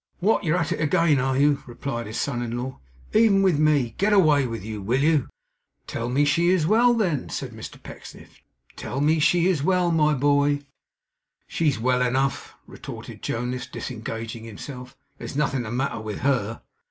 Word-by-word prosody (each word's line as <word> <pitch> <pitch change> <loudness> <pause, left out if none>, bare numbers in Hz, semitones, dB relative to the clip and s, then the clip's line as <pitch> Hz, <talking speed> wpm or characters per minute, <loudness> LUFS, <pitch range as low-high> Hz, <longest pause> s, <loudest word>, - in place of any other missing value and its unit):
'What, 205 +5 +1
you're 165 +1 +1
at 165 -1 -1
it 165 - -2
again, 155 -1 +3
are 130 0 0
you?' 145 0 +3
replied 120 -1 -5
his 110 - -4
son 125 -4 -2
in 120 0 -3
law. 130 +2 -5 0.3
'Even 210 -3 +4
with 180 -6 +3
me? 145 -7 +2
Get 210 +2 +3
away 150 -9 +4
with 115 -4 -6
you, 110 -2 -5
will 125 +8 0
you?' 155 -4 +2 0.6
'Tell 115 +1 -4
me 140 +4 +2
she 165 +4 +2
is 180 -4 +2
well 235 +6 +4
then,' 175 - -1
said - - -5
Mr - - -9
Pecksniff. - - -12 0.3
'Tell 135 - -5
me 155 +3 +3
she 170 +3 +3
is 180 -6 +2
well 180 +2 +2
my 155 -2 +3
boy!' 145 +1 +2 0.8
'She's 150 -6 0
well 125 +2 +1
enough,' 130 +2 -1
retorted - - -10
Jonas, 125 +1 -3
disengaging 115 -2 -6
himself. 125 +4 -9 0.2
'There's - - -7
nothing 140 -3 0
the 110 -2 -6
matter 125 -1 -2
with 110 -2 -6
HER. 120 -5 0
140 Hz, 175 wpm, -24 LUFS, 120-160 Hz, 0.8 s, Even